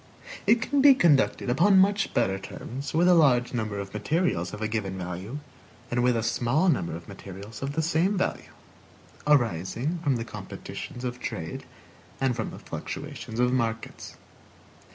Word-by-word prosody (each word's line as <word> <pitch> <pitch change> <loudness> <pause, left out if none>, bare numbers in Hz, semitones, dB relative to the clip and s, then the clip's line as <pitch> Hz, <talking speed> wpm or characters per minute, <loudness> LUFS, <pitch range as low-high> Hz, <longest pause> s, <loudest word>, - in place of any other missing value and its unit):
It 225 0 +5
can 285 -1 +1
be 275 -1 +8
conducted 150 - +3
upon 190 +9 +5
much 195 +1 +3
better 95 -5 +1
terms 130 +7 -7
with 170 +3 +3
a 180 - +7
large 135 -8 +4
number 110 -4 -2
of 100 -1 -6
materials 105 - 0
of 105 - -7
a 110 - -1
given 105 -4 -3
value 90 +8 -5 0.5
than 120 0 +1
with 125 -1 +3
a 115 - -1
small 135 +11 +2
number 85 - 0
of 85 - -10
materials 100 +2 -9
of 135 +1 -3
the 160 - 0
same 170 +5 +1
value; 185 - -2 0.8
arising 125 - +1
from 140 -5 +2
the 115 -1 -3
competitions 125 +1 -8
of 125 0 -4
trade - - -5 0.5
and 130 -2 +1
from 110 -2 -3
the - - -9
fluctuations 110 - -6
of 125 0 +3
markets. 115 -3 -3
125 Hz, 165 wpm, -27 LUFS, 110-160 Hz, 0.8 s, be